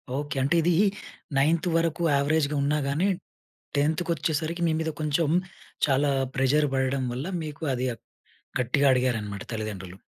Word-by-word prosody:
Okay. 145 0 -3
అంటే 150 +5 +2
ఇది 175 +2 +3 0.6
ninth 160 +5 +2
వరకు 165 +1 0
యావరేజ్‌గా 145 +1 +1
ఉన్నా 150 +2 +2
గాని, 155 +8 +1 0.7
10థ్ 155 +4 +2
కొచ్చేసరికి 165 +2 -1
మీ - - +2
మీద 160 0 -1
కొంచెం, 150 +1 +1 0.6
చాలా 140 +1 +2 0.2
ప్రెషర్ 145 +3 +3
పడడం 130 0 0
వల్ల, 130 +7 -4 0.2
మీకు 150 +1 -8
అది 125 +1 -1 0.7
గట్టిగా 140 +4 +2
అడిగారన్నమాట 110 -6 0
తల్లిదండ్రులు. 100 -4 -5
145 Hz, 130 wpm, -26 LUFS, 130-160 Hz, 0.7 s, ఇది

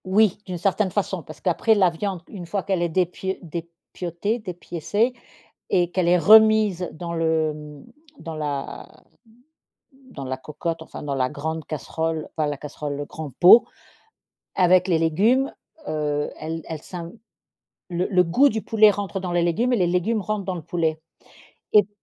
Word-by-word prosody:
Oui, 200 +1 +3
d'une 180 -1 -4
certaine 195 +3 +1
façon, 190 -2 -2
parce 155 0 -12
qu'après 200 +5 +2
la 190 -4 +4
viande, 185 +1 -4
une 180 -5 -9
fois 195 +2 -2
qu'elle 190 -3 -1
est 175 - +1
dépio 185 +2 -1
dépiotée, 170 +5 -5
dépiécée 205 +4 -2 0.6
et 175 -2 +2
qu'elle 180 -1 0
est 180 +1 +5
remise 215 -3 +5
dans 170 +1 -6
le, 160 -2 +1
mmh, 150 -1 -11 0.4
dans 165 - -6
la 145 -3 -5 1.1
dans 140 - -7
la 130 0 -3
cocotte, 165 +4 -4
enfin, 160 - -9
dans 145 -1 -3
la 130 -1 +1
grande 160 +3 -4
casserole 160 +3 -3
enfin 155 -2 0
la 145 - -2
casserole, 145 0 -6
le 145 - -4
grand 155 0 -7
pot, 185 +6 +9 0.9
avec 185 0 +4
les 170 -3 +3
légumes, 210 - +2 0.3
heu, 150 -1 -1
elle 160 +1 -5
elle 160 -2 -5
s'imp 170 0 -8 0.8
le 175 +1 -1
le 180 -3 +4
goût 210 +12 +4
du 220 -5 -1
poulet 215 -1 +5
rentre 200 -1 -4
dans 180 -2 -4
les 175 - +2
légumes 225 +9 +1
et - - +4
les 180 -3 +2
légumes 185 +6 0
rentrent 210 -1 -3
dans 185 - -2
le 170 - -6
poulet 160 0 -1 0.7
et 210 - +8
p 195 - -18
175 Hz, 170 wpm, -23 LUFS, 160-195 Hz, 1.1 s, pot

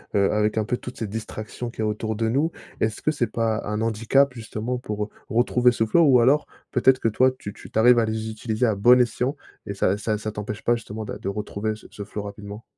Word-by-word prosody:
heu, 100 -1 +3
avec, 105 +1 +1
un 110 - +2
peu, 120 +3 -1
toutes 125 - -9
ces 110 - -3
distractions 110 +2 -6
qu'il 115 - -15
y - - +1
a 110 - +1
autour 110 +1 -2
de 110 +1 0
nous, 145 +7 +1 0.3
est-ce 110 -1 -1
que 155 - +1
c'est 125 -6 0
pas 115 0 -1
un 105 +1 -2
handicap 115 +5 +2
justement, 115 +1 -4
pour, 105 -4 -4
heu, - - -15 0.2
retrouver 120 +1 +3
ce 110 - +1
flow 165 +9 +4
ou 125 -4 +6
alors 140 +5 +3 0.2
peut-être 130 +1 +4
que 115 - +2
toi, 130 +4 +3
tu 105 - -7
tu - - -13
tu 110 - -1
arrives 120 +1 +6
à 115 - +3
les 110 0 -3
utiliser 110 +2 -1
à 110 -3 +2
bon 120 +5 +6
escient 125 +4 0 0.3
et 100 - -4
ça 95 0 +1
ça 105 +1 -1
ça 110 0 -4
t'empêche 105 0 -5
pas, 120 - +3
justement, 110 -1 -6
d'a 105 - -6
de - - -7
retrouver 105 +1 -3
ce 110 - -14
ce 100 - -7
flow 105 0 -5
rapidement? 100 +1 -8
110 Hz, 255 wpm, -24 LUFS, 105-125 Hz, 0.3 s, ou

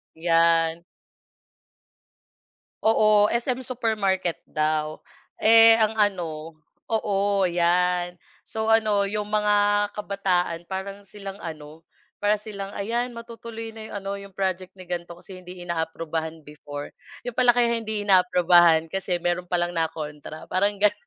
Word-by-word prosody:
'Yan. 165 0 +2 2.0
Oo, 215 -1 +4
SM 245 +2 -1
Supermarket 210 -8 -1
daw. 155 0 -1 0.4
Eh, 225 +1 +7
ang 220 -1 +2
ano, 165 -7 -2 0.3
oo 200 -3 +1
'yan. 175 0 +1 0.2
So, 220 0 -5
ano 215 -3 +3
'yong 210 +1 -3
mga 210 0 +2 0.4
kabataan 185 -4 -1
parang 195 +2 -6
silang 195 -1 -9
ano, 155 -3 -9 0.3
para 205 +1 +1
silang, 200 -2 -7
"Ayan 235 +4 -2
matutuloy 230 -1 -8
na 220 -1 -10
'yong 220 - -9
ano 195 0 -5
'yong 200 -1 -11
project 185 -1 -3
ni 185 -1 -13
ganito, 175 -1 -4
kasi 185 +2 -13
hindi 180 0 -11
inaaprubahan 160 -1 -4
before." 145 -1 -9 0.3
'Yon 245 -1 -7
pala 250 -1 +5
kaya 240 -1 +2
hindi 220 -2 -3
inaaprubahan 175 -4 +4
kasi 180 -1 -2
meron 175 +1 -1
palang 175 0 0
na 165 -1 +1
kontra 150 0 -8
parang 200 +2 +1
ganun. 210 -1 +3
190 Hz, 130 wpm, -24 LUFS, 170-210 Hz, 2.0 s, Eh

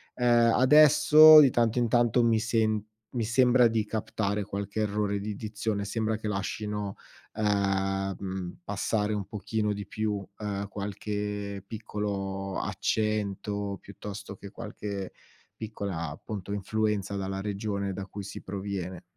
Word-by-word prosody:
Ehm, 120 -1 +4
adesso, 150 +3 +8
di 140 -3 +7
tanto 120 0 +2
in 120 - +2
tanto, 120 +1 +3
mi 115 -1 +3
sem 110 -2 +1 0.3
mi 120 -3 -2
sembra 125 +2 +4
di 110 -2 0
captare 105 -1 -2
qualche 100 +2 -4
errore 105 -1 0
di 105 +1 -3
dizione, 105 -1 -3
sembra 110 +1 -1
che 110 - -5
lascino, 105 0 -3 0.4
ehm, 95 -2 -1
passare 105 +2 -1
un 105 -2 -2
pochino 105 +1 -2
di 100 -1 -6
più, 105 -2 -2
ehm, 100 -1 -3
qualche 100 0 -4
piccolo 100 -3 -4
accento, 105 -2 -1
piuttosto 100 +1 -8
che 100 0 -11
qualche 100 -3 -6 0.4
piccola, 100 -7 -4
appunto, 100 +6 -7
influenza 105 0 -1
dalla 95 0 -3
regione 100 -1 -2
da 95 +1 -5
cui 100 +1 -8
si 100 - -8
proviene. 95 -2 -5
105 Hz, 130 wpm, -28 LUFS, 100-110 Hz, 0.4 s, adesso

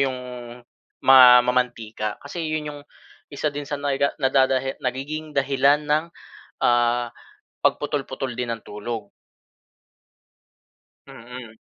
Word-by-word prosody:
'yong 130 -2 0 0.8
ma 125 -2 +9
mamantika. 115 -4 -2
Kasi 165 +4 -6
'yon 155 -1 -3
'yong 145 - -10 0.5
isa 145 +2 -1
din 145 0 -5
sa 145 - -2
naga 140 0 0
na 130 - +3
dadahila 135 0 +2
nagiging 145 +5 -4
dahilan 140 +1 +3
ng, 150 +2 +2 0.6
ah, 120 0 +2 0.5
pagputol-putol 135 -3 -1
din 125 -1 -2
ng 115 -1 -5
tulog. 105 0 -6 2.0
Mm. 120 -1 -11
130 Hz, 110 wpm, -23 LUFS, 120-145 Hz, 2.0 s, ma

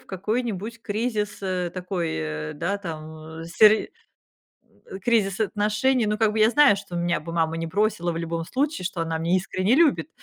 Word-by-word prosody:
в - - -25
какой-нибудь 220 +2 -3
кризис, 210 -1 -2
э, 180 -2 -2
такой, 180 -2 -3
э, 75 -1 -4
да, 185 +7 -2
там, 165 -5 -6
а, 160 +1 -9
сер 215 +5 +5 1.0
м, 190 - -7
кризис 205 -3 +1
отношений. 215 +4 +1
Ну, 210 0 0
как 215 -1 +2
бы 220 - -1
я 215 +1 +6
знаю, 290 -4 +6
что 195 -3 -8
меня 170 -2 0
бы 165 - -7
мама 165 -1 0
не 165 0 -3
бросила 200 -1 0
в 165 - -4
любом 165 0 -3
случае, 270 - -2
что 175 -2 -4
она 165 0 -2
меня 170 +3 +1
искренне 185 +4 +1
любит, 310 -1 +3
195 Hz, 190 wpm, -24 LUFS, 170-215 Hz, 1.0 s, я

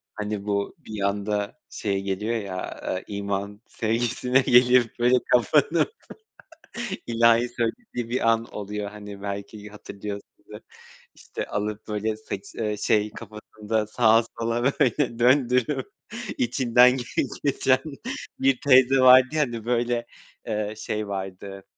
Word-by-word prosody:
hani, 105 -1 -4
bu 100 -1 -2
bir 110 -2 -8
anda 100 +1 -2
şey 100 -2 -2
geliyor 105 +4 -2
ya, 95 -4 -5
ııı, 95 - -3
iman 100 0 -4
sevgisine 120 +3 0
geliyor 125 0 +5
böyle 125 +1 +4 0.2
kapanıp 150 - +3 1.1
ilahi 115 +1 +4
söylediği 120 - -4
bir 120 -2 0
an 115 0 +2
oluyor, 105 0 -5
hani, 105 -1 -10
belki 100 +1 -6
hatırlıyorsundur, 100 -1 -9 0.6
işte, - - -6
alıp 105 +1 -4
böyle 105 +1 -2
saçı 100 -2 -8
eee, 105 -2 -2
şey 105 +1 +1
kafasında 105 0 -4
sağa 115 0 +4 0.2
sola 115 +1 -1
böyle 135 -3 +1
döndürüp 125 +1 +2 0.5
içinden 125 +1 +4 0.5
geçiren 130 -2 +2 0.6
bir 135 -2 +2
teyze 130 0 +6
vardı 130 0 +8
ya, 155 -1 +1
hani, 120 -5 -3
böyle, 120 0 0 0.4
eee, 105 -1 -2
şey 105 -1 -3
vardı, 95 0 -6
110 Hz, 120 wpm, -25 LUFS, 105-125 Hz, 1.1 s, vardı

